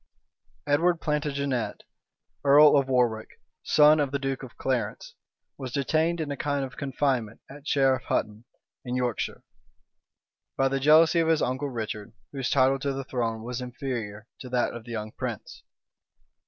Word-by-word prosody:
Edward 165 +4 +2
Plantagenet, 140 -5 -2 0.6
earl 145 +2 +7
of 140 -2 +3
Warwick, 120 -4 0 0.2
son 150 +1 +5
of 145 -2 +1
the 140 - -1
duke 135 -1 -3
of 130 -2 -11
Clarence, 120 -5 -2 0.5
was 130 -2 -5
detained 160 +5 0
in 155 -2 -3
a - - -2
kind 145 -1 -1
of 130 - -11
confinement 130 -5 -1
at 145 +2 -12
Sherif 135 -2 +2
Hutton, 105 +2 -2 0.4
in 125 -1 -4
Yorkshire, 125 -3 -2 1.1
by 135 0 +3
the 135 0 -1
jealousy 155 +4 +5
of 165 - +2
his 160 -1 +2
uncle 130 +3 -2
Richard, 110 -2 -5 0.2
whose 135 -2 -3
title 135 0 +3
to 140 +1 -2
the 135 0 -4
throne 115 -4 -3
was 125 +1 -4
inferior 120 -5 -5
to 125 - -9
that 125 -1 0
of 120 -1 -9
the 120 - -9
young 110 -1 -4
prince. - - -6
135 Hz, 155 wpm, -26 LUFS, 120-145 Hz, 1.1 s, earl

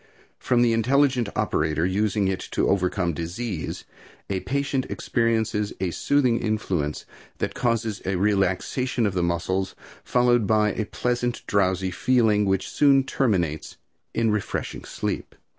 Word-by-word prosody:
From 120 -1 +2
the 115 -1 +3
intelligent 125 0 +2
operator 80 -6 0
using 100 +1 +1
it 95 -1 -1
to - - +1
overcome 90 -2 +1
disease, 85 +3 -4 0.5
a 95 - 0
patient 140 +2 -1
experiences 110 -3 0
a 95 -2 -1
soothing 130 +2 +2
influence 95 -9 -2 0.3
that - - -2
causes 115 -3 -1
a 95 0 -1
relaxation 100 +6 +1
of 100 - 0
the 90 - 0
muscles, 85 +3 -1 0.3
followed 120 -3 +3
by 105 -1 +3
a 110 - -2
pleasant, 120 0 -2
drowsy 95 -2 +1
feeling 110 0 +2
which 95 -1 0
soon 140 -2 +4
terminates 90 - -1 0.3
in 115 -1 +1
refreshing 105 -1 -3
sleep. - - -4
105 Hz, 130 wpm, -24 LUFS, 95-120 Hz, 0.5 s, soon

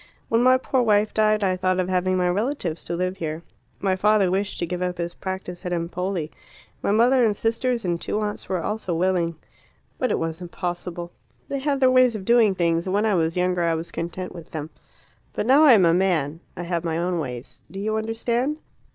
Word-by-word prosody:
"When 230 +1 +3
my 255 +1 +6
poor 260 0 0
wife 210 -2 +2
died 215 -1 +2
I 185 -1 +2
thought 185 0 0
of 180 - 0
having 185 0 +1
my 180 -1 +2
relatives 185 - -2
to 170 - -3
live 185 +2 -2
here. 160 -1 -4 0.4
My 190 -1 +1
father 200 -1 +3
wished 200 +2 -1
to 175 - -1
give 180 +1 -4
up 180 0 -2
his 170 0 -3
practice 185 -2 -6
at 180 - -4
Empoli; 175 -1 -2 0.5
my - - -1
mother 240 +5 +4
and 210 -3 +2
sisters 230 0 -1
and 170 -1 -1
two 210 - -2
aunts 210 -1 -4
were 185 -3 -1
also 210 -5 -2
willing. 175 -1 +1 0.6
But 255 - +1
it - - +1
was 165 +1 -3
impossible. 175 0 -5 0.4
They 275 - -3
have 280 0 0
their 260 -1 +5
ways 255 -2 +5
of 195 -3 -6
doing 225 -4 +4
things, 170 0 +1
and 185 - 0
when 210 +2 +2
I 215 - +2
was 165 -1 0
younger 180 0 +1
I 165 -1 +2
was 165 +1 -5
content 175 +2 -5
with 170 -3 -10
them. 155 0 -6 0.6
But - - -2
now 275 +6 +6
I 275 - +9
am 195 -6 +6
a 165 - +4
man. 165 -5 +1 0.2
I 175 - -4
have 170 -1 -2
my 165 -1 -1
own 175 0 -1
ways. 125 -4 -6
Do 195 - -7
you 215 +2 -1
understand?" 235 +6 -1
185 Hz, 220 wpm, -24 LUFS, 170-215 Hz, 0.6 s, I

